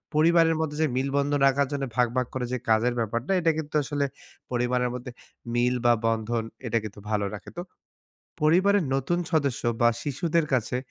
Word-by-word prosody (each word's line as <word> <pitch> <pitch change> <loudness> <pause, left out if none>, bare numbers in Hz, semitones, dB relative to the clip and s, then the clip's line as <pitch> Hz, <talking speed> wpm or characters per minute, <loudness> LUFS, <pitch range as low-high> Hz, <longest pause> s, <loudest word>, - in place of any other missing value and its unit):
পরিবারের 165 +1 +4
মধ্যে 150 -2 -3
যে 155 - +3
মিল 135 +1 0
বন্ধন 145 0 +1
রাখার 140 0 +2
জন্য 140 - -2
ভাগ, 125 -1 +3
ভাগ, 125 -2 +1
করে 125 -1 -2
যে - - +1
কাজের 115 +2 +3
ব্যাপারটা। 115 - -2
এটা 165 -1 +3
কিন্তু 155 -1 -5
আসলে 145 0 -1 0.5
পরিবারের 125 0 +1
মধ্যে 125 0 -7 0.4
মিল 125 +1 +2
বা 120 - +6
বন্ধন 115 0 0 0.2
এটা 115 - +1
কিন্তু 105 -1 -8
ভালো 105 -1 +1
রাখে। - - -10
তো। - - -2 0.8
পরিবারের 185 +4 +4
নতুন 135 +6 0
সদস্য 140 -5 +1 0.2
বা 120 - +7
শিশুদের 155 +3 0
কাছে 125 0 0
135 Hz, 175 wpm, -26 LUFS, 120-155 Hz, 0.8 s, বা